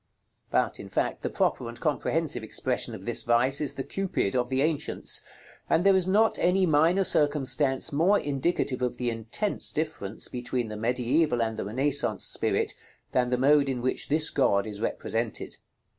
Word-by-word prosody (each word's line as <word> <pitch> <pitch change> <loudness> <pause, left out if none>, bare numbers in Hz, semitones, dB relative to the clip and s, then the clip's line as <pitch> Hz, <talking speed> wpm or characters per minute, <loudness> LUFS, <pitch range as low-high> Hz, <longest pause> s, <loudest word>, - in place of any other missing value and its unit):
But, - - 0
in - - -9
fact, - - -1
the - - -2
proper 120 - -1
and 120 0 -9
comprehensive 155 -3 0
expression 110 - -1
of - - -11
this - - -1
vice 125 +4 +2
is 145 - -2
the 135 - -3
Cupid 190 - -2
of 125 -1 0
the 135 +1 +1
ancients; 155 -1 -1 0.5
and 165 - +3
there 195 0 +5
is 185 -1 +3
not 215 +4 +3
any 185 +1 +3
minor 165 +4 +3
circumstance 145 -4 +2
more 180 +8 +3
indicative 140 -2 -1
of 125 -1 -1
the 120 -1 -1
intense 115 - -1
difference 150 -10 -3
between 125 -1 -3
the 110 - -6
mediæval 125 +3 +1
and 110 - -6
the 110 - -4
Renaissance 135 +7 -1
spirit, - - 0 0.4
than 125 -1 +1
the 125 - +1
mode 140 +2 +4
in 130 -2 -2
which 130 +2 -1
this 155 +2 +1
god 100 -7 +2
is 105 -1 -6
represented. 115 0 -2
135 Hz, 175 wpm, -27 LUFS, 120-155 Hz, 0.5 s, there